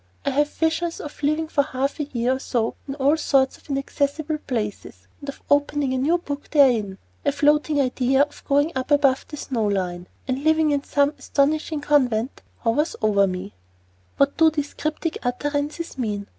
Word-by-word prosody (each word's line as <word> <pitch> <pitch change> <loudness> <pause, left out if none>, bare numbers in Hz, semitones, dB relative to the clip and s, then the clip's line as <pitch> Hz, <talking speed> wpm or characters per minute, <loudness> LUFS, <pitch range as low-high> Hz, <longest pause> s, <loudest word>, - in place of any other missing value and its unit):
I 280 - +1
have 295 +2 +2
visions 325 +2 -1
of 295 0 -9
living 305 +2 +1
for 300 -2 +2
half 275 0 -2
a 295 - -1
year 255 -1 0
or - - -11
so 235 -4 -1
in 275 - -4
all 285 +2 +3
sorts 270 -3 +2
of - - -24
inaccessible 285 +2 -1
places, 210 - -4
and 285 - -8
of 280 - -9
opening 285 -1 +1
a 260 - 0
new 315 +7 +2
book 290 -4 -6
therein. 235 -10 +3 0.3
A - - +2
floating 295 +1 +2
idea 265 0 +2
of 290 0 -8
going 285 +3 +3
up 260 +1 -3
above 280 -3 +3
the 300 - -8
snow 240 -6 -2
line, 180 -3 -2 0.2
and 265 +1 -2
living 315 -1 +3
in 285 -1 0
some 285 0 +2
astonishing 300 +2 0
convent, 255 -5 +1 0.2
hovers 290 +8 +1
over 200 -2 +4
me. 185 +2 -5 0.6
What 280 0 +2
do 320 -1 +6
these 295 -2 -4
cryptic 310 +2 -3
utterances 290 +4 -3
mean? 205 -4 -2
280 Hz, 180 wpm, -23 LUFS, 255-295 Hz, 0.6 s, do